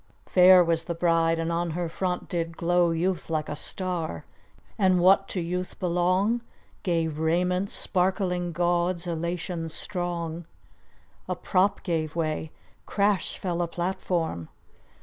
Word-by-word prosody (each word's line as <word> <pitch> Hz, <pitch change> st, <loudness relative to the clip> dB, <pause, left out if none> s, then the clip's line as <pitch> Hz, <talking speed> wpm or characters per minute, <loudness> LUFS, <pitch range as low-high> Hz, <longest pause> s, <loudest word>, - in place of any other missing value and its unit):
Fair 180 Hz, 0 st, +7 dB
was 165 Hz, -1 st, +1 dB
the 170 Hz, -, -3 dB
bride, 165 Hz, -1 st, +2 dB
and 165 Hz, 0 st, -1 dB
on 170 Hz, +1 st, -1 dB
her 175 Hz, -1 st, -1 dB
front 180 Hz, +2 st, -3 dB
did 165 Hz, -2 st, -3 dB
glow 175 Hz, 0 st, +3 dB
Youth 170 Hz, +2 st, -1 dB
like 155 Hz, -1 st, -1 dB
a 150 Hz, -, -4 dB
star; 165 Hz, -, -3 dB, 0.5 s
and 185 Hz, -2 st, +3 dB
what 195 Hz, +2 st, +5 dB
to 185 Hz, -, -3 dB
youth 180 Hz, +2 st, -3 dB
belong, 185 Hz, +5 st, +1 dB, 0.4 s
Gay 170 Hz, -3 st, +1 dB
raiment 175 Hz, +5 st, 0 dB
sparkling 180 Hz, -1 st, 0 dB
gauds, 175 Hz, +1 st, 0 dB
elation 170 Hz, 0 st, -3 dB
strong. 170 Hz, -1 st, -4 dB, 0.8 s
A -, -, 0 dB
prop 190 Hz, +1 st, +1 dB
gave 160 Hz, -3 st, -2 dB
way! 155 Hz, -1 st, -2 dB, 0.4 s
crash 200 Hz, -1 st, +1 dB
fell 175 Hz, -2 st, -2 dB
a 175 Hz, -, 0 dB
platform! 170 Hz, -, -2 dB
175 Hz, 130 wpm, -26 LUFS, 165-185 Hz, 0.8 s, Fair